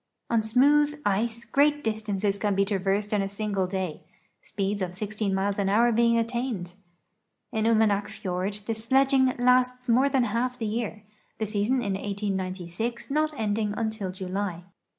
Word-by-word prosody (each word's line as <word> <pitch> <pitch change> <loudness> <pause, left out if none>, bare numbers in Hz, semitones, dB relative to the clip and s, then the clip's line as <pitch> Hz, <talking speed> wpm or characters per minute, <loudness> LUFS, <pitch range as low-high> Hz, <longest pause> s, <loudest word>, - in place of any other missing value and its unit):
On 230 -1 +3
smooth 290 +6 +3
ice 225 +4 0
great 290 +4 +2
distances 210 -2 -1
can 205 -1 0
be 195 +1 +3
traversed 200 +1 -1
in 205 - +2
a 195 - -1
single 200 -2 -2
day, 185 -4 -3 0.4
speeds 200 0 -3
of 180 -1 -3
16 210 +1 -2
miles 195 +1 0
an 195 -1 +1
hour 235 +4 +4
being 235 +1 +3
attained. 230 -6 -2 0.8
In 220 0 0
Umanak 215 -3 +3
fiord 200 0 -3
the 225 - -1
sledging 260 +3 +3
lasts 250 +1 +2
more 255 +4 +4
than 265 -2 +2
half 240 +3 -1
the 225 - -3
year, 215 -1 -3 0.3
the 220 - -1
season 215 +5 0
in 200 -3 -1
1896 195 +3 -3
not 305 +2 +1
ending 210 -1 0
until 220 -4 -2
July. 185 -1 -4
215 Hz, 155 wpm, -26 LUFS, 195-235 Hz, 0.8 s, hour